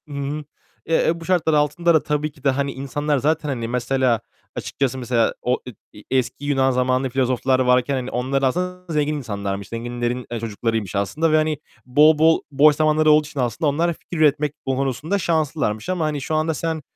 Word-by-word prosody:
Hı 145 - -10
hı. 140 +2 -3 0.4
Eee, 165 0 +2
bu 165 0 -10
şartlar 175 -3 +2
altında 150 +3 +2
da 160 - +3
tabii 150 0 -1
ki 140 -2 -22
de 140 - +3
hani 140 +1 0
insanlar 145 +2 -1
zaten 150 +2 0
hani 120 -4 -3
mesela, 125 -1 +1 0.3
açıkçası 135 -1 -2
mesela, 120 -2 +1
o, 125 +1 +1 0.4
e - - -13 0.2
eski 130 +3 -2
Yunan 135 -2 +2
zamanlı 130 +1 +1
filozoflar 130 0 +1
varken 125 +1 +3
hani 130 0 -4
onlar 130 +3 -1
aslında 180 +4 -2
zengin 150 0 +1
insanlarmış. 100 -6 -4
Zenginlerin, 120 +1 -3
eee, 120 - -3
çocuklarıymış 110 -3 -3
aslında 150 +12 0
ve - - +4
hani 155 -1 +1 0.3
bol 150 +5 +5
bol, 160 +1 +4
boş 145 +2 +5
zamanları 155 0 +3
olduğu 150 0 +4
için 150 -2 -7
aslında 125 +5 0
onlar 170 +4 +1
fikir 170 - -9
üretmek 150 -1 +2
konusunda 135 +7 -1
şanslılarmış 155 - -1
ama 180 -3 0
hani 150 -2 -2
şu 155 - -2
anda 155 +1 +1
sen, 160 +1 -3
140 Hz, 185 wpm, -21 LUFS, 125-155 Hz, 0.4 s, bol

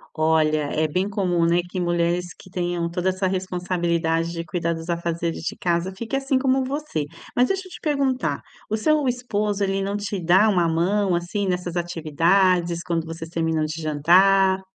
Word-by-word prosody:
Olha, 155 -1 +2
é 155 0 +1
bem 185 +6 -1
comum, 180 -4 0
né, 170 +1 +3
que 185 +1 -5
mulheres 175 0 0
que - - -16
tenham 175 -2 -2
toda 180 +2 -1
essa 185 +1 -1
responsabilidade 175 -3 -1
de 165 -1 -4
cuidar 170 0 -1
dos 165 +1 -7
afazeres 170 -1 -2
de - - -3
casa 175 +1 -1
fique 225 +6 -5
assim 270 -1 +1
como 265 0 +2
você. 270 - -3 0.3
Mas 250 +1 +4
deixa 385 -1 -2
eu - - -16
te - - -9
perguntar: 275 -4 0 0.3
o 215 - 0
seu 300 +4 +2
esposo, 210 -5 -1
ele 195 0 0
não 200 +1 -2
te 205 -1 -3
dá 190 +6 +5
uma 175 -4 +2
mão, 185 +3 +1
assim, 190 +4 -2
nessas 180 -1 -2
atividades, 170 +1 +1
quando 165 -2 -2
vocês 165 0 -6
terminam 160 -2 0
de 160 +1 -5
jantar? 190 +5 +4
180 Hz, 180 wpm, -23 LUFS, 170-200 Hz, 0.3 s, dá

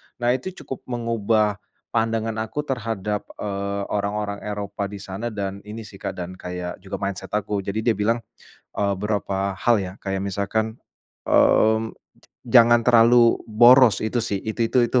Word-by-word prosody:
Nah, 120 0 +1
itu 130 +7 -2 0.2
cukup 135 - -6
mengubah 110 -3 0 0.3
pandangan 115 -1 0
aku 110 +7 -3
terhadap, 110 -6 -3
eee, 100 0 -3
orang-orang 100 0 -2
Eropa 100 -1 -4
di 100 - -9
sana 100 +5 -5
dan 100 -3 -4
ini 110 +1 -7
sih, 100 -2 -13
Kak, 100 -1 -4
dan 90 +1 -7
kayak 90 0 -6
juga 95 +1 -7
mindset 100 +1 -4
aku. 105 -1 -1
Jadi, 100 +3 -3
dia 115 - +2
bilang, 115 +3 +1 0.5
eee, 100 -1 +1
berapa 100 -2 -1
hal 115 0 +3
ya, 90 -1 -5
kayak 95 -1 -3
misalkan, 110 +3 -2 0.5
mmm, 110 0 +4 0.5
"Jangan 120 -1 +5
terlalu 120 0 +5
boros," 120 +2 +6
itu 110 +3 0
sih, 115 -3 -1
itu 115 +1 -1
itu 125 +1 +3
itu, 125 - +2
105 Hz, 155 wpm, -23 LUFS, 100-115 Hz, 0.5 s, boros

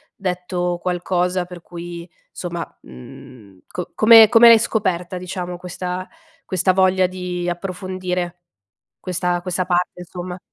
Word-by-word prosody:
detto 180 -1 -2
qualcosa 180 0 0
per 175 -1 -11
cui 170 0 -8 0.2
somma, 170 -2 -5 0.2
mhmm, 95 - -13
co 180 - -6
come 220 0 +8
come 235 0 +7
l'hai 230 -1 +9
scoperta, 185 -5 -1
diciamo, 180 -1 -5
questa 180 +1 -5 0.4
questa 185 0 +1
voglia 185 0 +3
di 180 -1 -4
approfondire 180 -1 -4 0.6
questa 180 -1 -1
questa 180 0 -2
parte, 180 0 0
insomma? 180 +1 -7
180 Hz, 120 wpm, -20 LUFS, 175-185 Hz, 0.6 s, l'hai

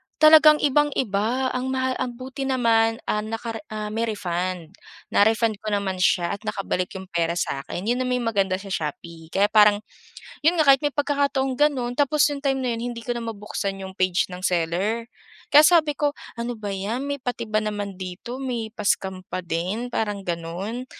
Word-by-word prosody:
talagang 310 0 +8
ibang-iba 260 -4 +1
ang 255 +1 -2
maha 260 0 0
ang 245 -1 -3
buti 265 +2 -5
naman, 230 -3 +3
ah, 210 - 0
nakare 225 +1 -4
ah, 215 -1 -5
may 230 +1 -1
refund. 180 -4 -3 0.4
Na-refund 220 0 +3
ko 215 - -10
naman 190 -2 -2
siya 175 -1 +2
at 200 - -4
nakabalik 195 -3 -1
'yung 190 - -6
pera 170 0 0
sa 140 -5 -1
akin. 175 - -6
'Yun 240 +4 0
na 255 - -1
may 250 -1 0
maganda 200 -5 +1
sa 195 +1 -8
Shopee 165 +1 -5
kaya 200 +5 +1
parang, 210 -1 +5 0.6
'yun 330 - +6
nga 310 -4 +3
kahit 270 -1 +7
may 290 - 0
pagkakataong 280 -2 0
gano'n 255 -4 +1
tapos 290 +1 +2
'yung 290 - -3
time 270 -1 +1
na 255 - -1
'yun 235 +1 -3
hindi 230 - -8
ko 240 0 -3
na 235 - -5
mabuksan 200 -3 -4
'yung 190 0 -8
page 185 -1 +1
ng 180 +1 -5
seller. 185 +7 0 0.4
Kaya 300 +1 +8
sabi 310 -4 +4
ko, 290 -1 +1 0.2
"Ano 235 +1 -3
ba 215 -3 -6
’yan, 200 +6 -3
may 285 - -1
pati 245 -3 -4
ba 215 - +1
naman 205 -2 -3
dito, 185 +7 -6
may 245 -4 -3
pa 215 -1 -8
scam 190 -2 0
pa 185 - -4
din," 180 +8 -3
parang 210 -4 -2
gano'n. 180 +7 -4
220 Hz, 190 wpm, -24 LUFS, 190-255 Hz, 0.6 s, talagang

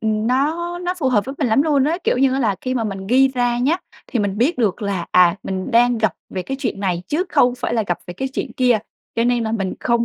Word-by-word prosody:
ừm, 215 0 0
nó 320 +8 0
nó 360 0 -2
phù 275 -6 +1
hợp 215 -5 +2
với 270 - -6
mình 275 - +1
lắm 225 +5 +4
luôn 290 -3 +2
á. 315 +4 +1
Kiểu - - +2
như 270 0 +3
á 265 - 0
là 210 -6 +1
khi 255 0 -2
mà 235 -3 -1
mình 195 -2 -5
ghi 265 +4 +4
ra 245 -2 0
nhá, 275 +7 +2 0.3
thì 245 - -2
mình 205 -1 -1
biết 270 +8 +1
được 215 -2 0
là, 195 -4 -2
à, 180 -1 +5
mình 190 -1 -4
đang 240 0 +4
gặp 220 -3 +1 0.2
về 185 - -3
cái 270 +7 -4
chuyện 195 - -2
này 180 -3 -1
chứ 330 +5 0
không 245 -6 +3
phải 240 - -3
là 225 - +2
gặp 175 -3 -1
về 175 - -7
cái 265 +9 -3
chuyện 265 -1 -4
kia. 245 -2 +3 0.4
Cho 230 - +1
nên 240 -1 +1
là 220 - -2
mình 195 -4 -2
không 235 -1 +1
240 Hz, 280 wpm, -20 LUFS, 205-265 Hz, 0.4 s, à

